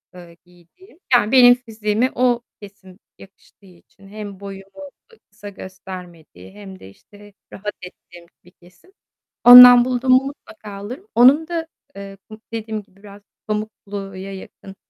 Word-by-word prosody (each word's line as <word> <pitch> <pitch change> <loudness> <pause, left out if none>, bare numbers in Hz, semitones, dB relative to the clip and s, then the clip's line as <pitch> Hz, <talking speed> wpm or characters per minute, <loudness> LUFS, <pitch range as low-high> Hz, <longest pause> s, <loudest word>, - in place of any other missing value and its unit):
ııı, 175 -2 -15
giydiğim. 180 - -24
Yani, 230 -3 +2
benim 245 -2 +6
fiziğime 225 0 -3
o 245 -1 0 0.2
kesim 200 -1 -16 0.2
yakıştığı 195 +1 -21
için 185 +2 -22
hem 205 -1 -10
boyumu, 195 +8 -12 0.2
eee, 455 - -23
kısa 205 -1 -12
göstermediği 185 -3 -13
hem 195 -2 -13
de, - - -14
işte, 205 - -20 0.2
rahat 205 +1 -7
ettiğim 175 -1 -15 0.2
bir 180 - -21
kesim. 180 - -25 0.5
Ondan 245 0 +9
buldum 255 0 -2
mu 255 +1 +3
mutlaka 220 -6 -12
alırım. 215 - -10
Onun 270 +7 +4
da, 330 -1 -5 0.3
eee, 195 0 -11
bu, 215 0 -14
dediğim 220 -1 -6
gibi, 190 - -33
biraz 205 0 -15 0.3
pamukluya 200 -2 -7
yakın, 195 0 -13
205 Hz, 140 wpm, -18 LUFS, 190-245 Hz, 0.5 s, Ondan